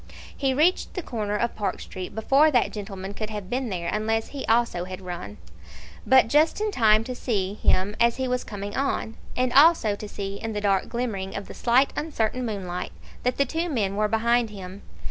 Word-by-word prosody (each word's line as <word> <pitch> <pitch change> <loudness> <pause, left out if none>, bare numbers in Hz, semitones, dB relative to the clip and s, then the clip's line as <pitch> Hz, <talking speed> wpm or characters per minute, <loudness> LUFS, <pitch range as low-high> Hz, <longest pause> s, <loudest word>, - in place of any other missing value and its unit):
He 270 -1 +1
reached 330 +6 +2
the 365 - -3
corner 210 -6 -3
of 235 +2 -1
Park 200 -3 -2
Street 185 +1 -7
before 275 +8 +4
that 245 -6 +2
gentleman 195 -2 -6
could 215 +1 -5
have 205 -3 -6
been 255 -1 -1
there 175 -3 -3
unless 220 +4 -1
he 280 -2 -6
also 225 -6 +2
had 185 0 -7
run; 175 - -7 0.7
but 260 -2 +6
just 300 - +3
in 425 0 0
time 220 - +4
to 255 - -5
see 205 -6 -1
him 205 -1 +1
as 235 0 +4
he 260 0 -1
was 250 0 -1
coming 205 -1 -6
on, 265 -4 -1 0.2
and 250 -1 +1
also 280 -8 +6
to 210 0 -8
see 200 -1 -5
in 225 -1 -3
the 210 - -2
dark 195 -2 +1
glimmering 225 -6 -3
of 200 - -5
the - - -8
slight 250 +3 +3
uncertain 255 -5 -1
moonlight 190 -6 -4 0.3
that 250 0 0
the 280 - +3
two 330 +6 -2
men 205 -9 0
were 210 +1 +2
behind 235 +1 +2
him. 195 -1 -9
220 Hz, 205 wpm, -25 LUFS, 200-255 Hz, 0.7 s, but